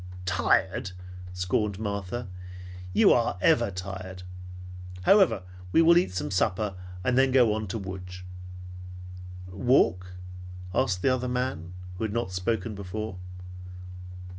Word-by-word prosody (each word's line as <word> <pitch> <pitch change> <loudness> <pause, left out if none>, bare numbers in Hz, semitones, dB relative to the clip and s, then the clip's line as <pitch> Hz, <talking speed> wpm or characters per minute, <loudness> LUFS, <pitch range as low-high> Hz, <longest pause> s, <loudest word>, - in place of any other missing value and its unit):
"Tired?" 95 +3 +1 0.4
scorned 95 +3 -1
Martha. 100 +2 -3 0.6
"You - - +6
are - - +1
ever - - +4
tired! 95 0 -7 0.8
However, 165 - +5 0.3
we 165 - +5
will 170 +1 +7
eat 175 - +3
some 90 +1 -3
supper, 95 +2 +1 0.3
and 125 +3 +2
then 135 0 +4
on 110 -3 +3
to 95 - -3
Lodz." 90 -2 -7 1.3
"Walk?" 90 -4 +2 0.6
asked 95 -7 +1
the 130 - +4
other 125 0 -1
man, 125 -9 -3 0.2
who 110 - 0
had 105 - -3
not 115 -5 -1
spoken 110 +5 -1
before. 100 0 -5
100 Hz, 115 wpm, -27 LUFS, 90-120 Hz, 1.3 s, will